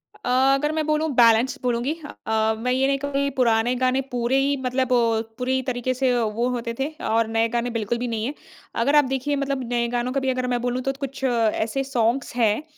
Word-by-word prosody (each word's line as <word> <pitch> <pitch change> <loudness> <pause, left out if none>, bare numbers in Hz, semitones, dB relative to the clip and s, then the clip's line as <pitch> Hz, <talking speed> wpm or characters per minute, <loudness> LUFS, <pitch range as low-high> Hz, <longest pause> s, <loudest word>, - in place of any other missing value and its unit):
अ, - - -6 0.2
अगर 295 +2 +1
मैं 315 -1 -1
बोलूँ 305 +1 +1
बैलेंस 235 +1 +4
बोलूँगी। 245 +4 0 0.3
अ, 220 0 +2
मैं 250 +3 -1
ये 265 +1 +2
नहीं 275 - +1
कहूँगी 280 0 -1
पुराने 235 -1 +3
गाने 255 +1 +1
पूरे 245 +2 +1
ही 280 +1 +2
मतलब 255 0 0 0.5
पूरी 260 +1 0
तरीके 255 0 -1
से 255 0 +1
वो 225 +2 -1
होते 235 -1 -3
थे 270 - 0 0.2
और 225 0 +2
नए 225 0 +1
गाने 240 +1 -1
बिल्कुल 220 +2 -1
भी 245 +1 -3
नहीं 225 -1 -2
हैं। 275 - -3 0.5
अगर 285 +2 +2
आप 295 - +6
देखिए 270 +2 -1
मतलब 275 -2 -2
नए 235 -1 +1
गानों 245 +1 -2
का 275 - +1
भी 265 -1 -1
अगर 255 -1 -1
मैं 245 -1 -1
बोलूँ 245 +1 -1
तो 270 - -1
कुछ 275 -1 -6
ऐसे 230 +1 +1
सॉन्ग्स 245 -1 -1
हैं 230 +3 +2
250 Hz, 210 wpm, -23 LUFS, 235-270 Hz, 0.5 s, आप